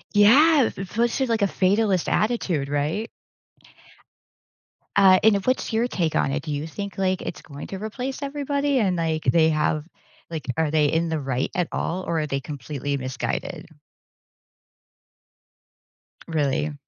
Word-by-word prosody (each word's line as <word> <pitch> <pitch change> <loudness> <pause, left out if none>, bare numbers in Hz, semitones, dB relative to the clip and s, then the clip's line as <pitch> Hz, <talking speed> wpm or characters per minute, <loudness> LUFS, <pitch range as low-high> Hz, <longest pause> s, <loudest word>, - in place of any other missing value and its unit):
Yeah, 275 +6 +6
especially, 230 +7 0
like, 230 -3 0
a 200 - +4
fatalist 195 -1 +1
attitude, 185 - 0
right? 150 +10 -1 1.9
Uh, 190 -2 +7
and 220 -2 +6
what's 255 -2 0
your 230 +2 +2
take 170 -8 -1
on 135 - +1
it? 150 +2 -2
Do 155 - -5
you 145 +2 -3
think, 200 +2 -6
like, 190 -1 0
it's - - -6
going 140 0 -9
to 195 - -6
replace 250 +7 -5
everybody, 280 -1 0
and, 190 -4 +1
like, 160 -2 -1
they 160 -1 +4
have 155 0 0 0.4
like, 160 -2 -5
are 160 -2 +1
they 155 -1 +3
in 165 +2 0
the 160 - -1
right 135 -2 -2
at 180 -2 0
all, 185 +3 -2
or 165 -2 0
are 150 - -2
they 135 -1 -1
completely 145 0 -4
misguided? 130 -1 -4 2.6
Really? 150 -1 0
175 Hz, 145 wpm, -24 LUFS, 150-220 Hz, 2.6 s, Uh